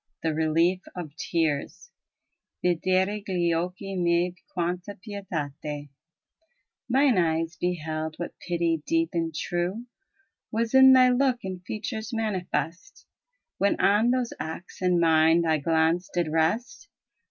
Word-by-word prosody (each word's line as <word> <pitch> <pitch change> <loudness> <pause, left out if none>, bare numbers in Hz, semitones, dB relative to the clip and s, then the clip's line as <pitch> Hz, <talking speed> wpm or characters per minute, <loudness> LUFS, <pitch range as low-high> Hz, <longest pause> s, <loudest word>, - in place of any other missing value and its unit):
THE 160 -1 +1
RELIEF 165 +4 +2
OF 160 -5 -7
TEARS 160 -4 -2 0.7
yidero 185 +4 +1
gli 175 -4 0
occht 180 +2 -2 0.2
miei 175 0 +2 0.2
quanta 180 +3 -3
pietate 150 -8 -5 1.0
Mine 260 -4 +4
eyes 165 0 0
beheld 160 -3 -3
what 175 - -5
pity 170 -2 -1
deep 330 0 +1
and 165 -1 -1
true 175 +8 -2 0.7
Was 225 +1 -1
in 265 0 +8
thy 255 -1 +7
look 250 -1 +1
and 185 -1 -6
features 220 +3 -5
manifest, 185 - -3 0.5
When 200 - +2
on 210 +4 +4
those 250 -1 0
acts 165 +4 -7
and 180 -1 +3
mien 160 0 +4
thy 160 -2 +2
glance 165 +3 +1
did 175 -3 0
rest. 170 - -1
175 Hz, 120 wpm, -26 LUFS, 165-210 Hz, 1.0 s, in